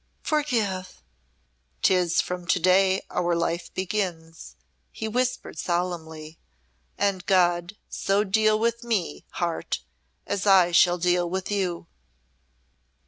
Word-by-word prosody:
forgive!" 220 -12 -1 0.8
"Tis 180 -3 +3
from 180 -1 -6
to 180 - +2
day 190 +2 +3
our 175 -1 0
life 170 0 -2
begins," 175 -4 -4 0.4
he 220 - -5
whispered, 250 -6 -2
solemnly. 165 -3 -3 0.6
"And 200 -3 0
God 175 +1 +2
so 200 +1 0
deal 215 +1 +3
with 235 +2 -1
me, 220 -8 -2
Heart, 170 -2 -2 0.4
as 200 +1 -2
I 185 -3 +6
shall 175 +1 +5
deal 175 0 +1
with 190 +2 -3
you." 185 -4 -1
185 Hz, 110 wpm, -25 LUFS, 175-205 Hz, 0.8 s, I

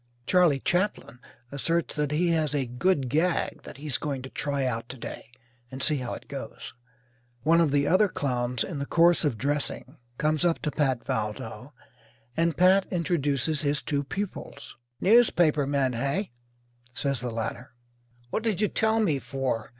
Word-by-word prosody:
Charley 175 -5 +4
Chaplin 175 -6 -1 0.3
asserts 165 +4 -1
that 150 -1 -1
he 165 +4 +1
has 155 -3 +1
"a 135 -2 +1
good 135 +4 0
gag" 160 +7 0
that - - -11
he's 145 -2 -3
going 140 -3 -3
to 130 - -8
try 140 -2 -1
out 115 -2 -3
to 130 - -7
day 115 - -8 0.4
and 130 +2 -5
see 155 -3 +2
how 125 -2 -4
it - - -12
goes. - - -7 0.7
One 165 +3 +5
of 165 - +3
the 140 0 +2
other 200 +4 +4
clowns 125 -6 -1
in 160 -6 -5
the 140 - -3
course 170 +1 +4
of 140 -7 0
dressing 145 +2 -2 0.2
comes 155 +1 +1
up 170 -2 +3
to 150 - 0
Pat 135 -6 0
Valdo, 105 -1 -4 0.6
and 165 -2 +1
Pat 185 +2 +5
introduces 155 -4 0
his 145 0 0
two 145 -2 -1
pupils. 175 -2 -6 0.2
"Newspaper 175 - +4
men, 140 -3 +1
hey?" 140 - -1 0.6
says 140 -3 -1
the 125 - -3
latter. 115 +2 -4 0.6
"What - - 0
did 220 -5 0
you 210 - +2
tell 220 0 +2
me 155 -10 +1
for? 130 -2 -3
145 Hz, 165 wpm, -27 LUFS, 130-170 Hz, 0.7 s, One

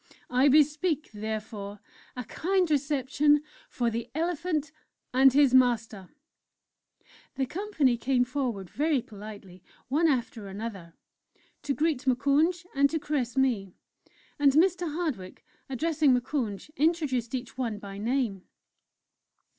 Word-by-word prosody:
I 255 +3 +4
bespeak, 300 +2 +2
therefore, 210 -1 -5 0.4
a 250 - -3
kind 360 - 0
reception 290 +1 +2 0.3
for 240 -2 -1
the 230 +1 -4
Elephant 320 -2 -1 0.4
and 265 +1 +6
his 275 -1 +4
Master." 230 -6 +2 1.3
The 270 - 0
Company 310 - 0
came 245 +1 +2
forward 245 -7 -3
very 290 - 0
politely, 200 -3 -11 0.3
one 310 +5 +3
after 235 -7 -1
another, 195 -4 -7 0.7
to 280 - -2
greet 295 -4 0
Moukounj, 290 +8 +2
and 280 0 +3
to 320 - -1
caress 275 -5 -2
me; 225 -9 +1 0.6
and 280 -2 +5
Mr. 350 +1 +2
Hardwick, 290 - -4 0.2
addressing 295 0 +2
Moukounj, 245 -3 -3
introduced 285 -7 +1
each 250 -1 -6
one 235 -4 -2
by 200 -1 -8
name. 225 -4 -1
265 Hz, 115 wpm, -28 LUFS, 225-300 Hz, 1.3 s, and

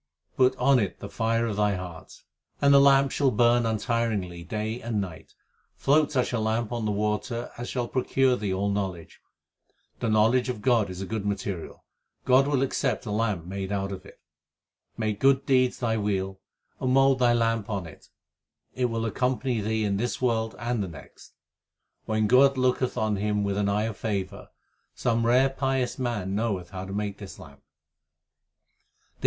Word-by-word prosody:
Put 130 0 +3
on 135 -1 +4
it 100 -5 -2
the 100 - -8
fire 115 0 0
of 110 -3 -3
thy 105 -1 +2
heart, 90 -3 -9 0.4
And 140 0 +5
the 140 - +8
lamp 140 0 +5
shall 140 -2 +2
burn 120 0 +3
untiringly 110 -6 -1
day 110 +6 -4
and 115 -2 -2
night. 90 -5 -7 0.4
Float 150 +2 +2
such 125 -3 0
a 120 - 0
lamp 110 +1 -1
on 120 -2 -2
the 105 - 0
water 105 +3 -2
As 120 - -5
shall 125 -2 -2
procure 130 +1 +1
thee 105 -5 -3
all 100 +2 0
knowledge. 95 -5 -4 0.8
The 115 - -1
knowledge 115 +4 +3
of 115 -4 -4
God 120 -6 +3
is 90 0 -7
a - - -3
good 110 +1 -3
material; 100 -4 -4 0.4
God 130 +2 +5
will 140 -2 +1
accept 130 - -1
a 105 - -4
lamp 105 -5 -1
made 95 +1 -5
out 100 -1 -2
of 95 -1 -7
it. 100 - -16 0.8
Make 110 -2 -2
good 135 0 +3
deeds 130 -2 +2
thy 115 -2 0
wheel, 95 -2 -2 0.4
and 130 - 0
mould 135 0 +4
thy 120 -1 +4
lamp 115 -2 0
on 100 -4 -3
it; 80 - -14 0.6
It 125 - 0
will 115 -1 -1
accompany 125 0 -1
thee 110 +1 -1
in 100 -1 0
this 120 +4 -2
world 115 -3 0
and 120 0 -2
the 100 - -2
next. 85 - -13 0.7
When 110 0 0
God 135 +5 +5
looketh 130 0 +1
on 110 -2 0
him 105 +1 0
with 100 -1 -1
an 100 0 0
eye 105 +1 +1
of 110 -2 -4
favour, 100 -4 -4 0.5
Some 115 -1 0
rare 130 +3 +4
pious 135 -2 -1
man 110 -7 -2
knoweth 100 -5 -2
how 95 -1 -6
to 95 - -8
make 100 0 -3
this 100 -3 -9
lamp. 70 0 -14
110 Hz, 180 wpm, -26 LUFS, 100-125 Hz, 0.8 s, the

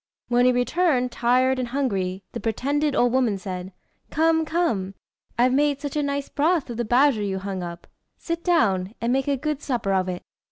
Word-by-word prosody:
When 245 0 +3
he 255 - +6
returned, 250 +1 +1
tired 255 +2 +2
and 250 - -2
hungry, 195 -8 -2
the 235 - -5
pretended 280 +6 0
old 245 0 +3
woman 245 -6 +2
said 185 -1 -6 0.4
"Come, 320 +1 +2
come; 265 - -1 0.4
I've 250 +1 +3
made 285 0 +2
such 285 0 -5
a 300 - +1
nice 280 -1 -2
broth 310 -3 0
of 230 - -6
the 240 - -1
badger 245 0 +3
you 195 -2 -2
hung 190 -1 -4
up. 170 -1 -7 0.3
Sit 335 0 -4
down, 205 - +1
and 235 +2 0
make 270 +1 0
a 280 -1 +1
good 300 +1 -3
supper 235 -7 -1
of 185 -1 +1
it." 180 -1 -5
250 Hz, 195 wpm, -24 LUFS, 200-285 Hz, 0.4 s, he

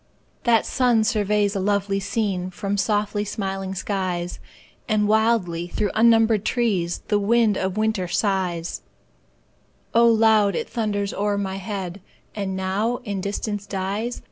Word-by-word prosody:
That 230 -3 +4
sun 245 -4 +2
surveys 210 -2 +1
a - - 0
lovely 200 0 0
scene 195 -3 -2
From 200 +2 -3
softly 205 0 0
smiling 195 -2 -4
skies; 185 -3 -3 0.5
And 210 -1 +2
wildly 210 -6 +1
through 205 +3 -1
unnumbered 225 -2 +4
trees 205 -9 0
The 210 -2 +3
wind 220 0 +3
of 190 +1 -2
winter 215 -4 0
sighs: 180 -3 -1 1.1
Now 235 - +5
loud, 220 -4 +4
it - - -2
thunders 205 -3 -2
o'er 205 0 0
my 195 -1 -3
head, 195 -1 -5 0.3
And 195 -2 -3
now 195 +6 -1
in 200 -5 -3
distance 205 +1 -3
dies. 200 +5 -3
205 Hz, 135 wpm, -23 LUFS, 190-220 Hz, 1.1 s, Now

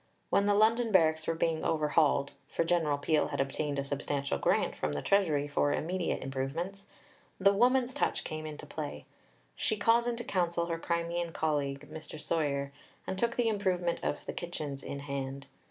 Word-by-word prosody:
When 200 - +3
the 205 - +4
London 225 +2 +4
barracks 160 -4 +4
were 165 - +1
being 165 -1 0
overhauled 150 -2 +2 0.2
(for - - 0
General 165 -4 +2
Peel 150 +1 +2
had - - -4
obtained 140 +1 -1
a 140 - 0
substantial 140 0 -2
grant - - +2
from 75 - -2
the 70 - -2
Treasury 160 -8 +2
for 145 0 +1
immediate 175 +4 -1
improvements), 165 +9 -4 0.5
the 200 +1 +5
"woman's 250 +4 +3
touch" - - 0
came 155 0 -5
into 150 -1 -7
play. 75 +1 -6 0.5
She 215 - 0
called 230 +3 +4
into 240 0 -2
counsel 170 -4 0
her 165 -1 -3
Crimean 170 0 -1
colleague, 145 -2 -1
Mr. 155 -1 -8
Soyer, 140 -4 -1 0.3
and - - -2
took 235 +2 +1
the 240 -2 +2
improvement 185 -5 0
of - - -2
the - - -4
kitchens 150 -6 -5
in 140 - -5
hand. 140 -1 -4
160 Hz, 170 wpm, -31 LUFS, 145-190 Hz, 0.5 s, the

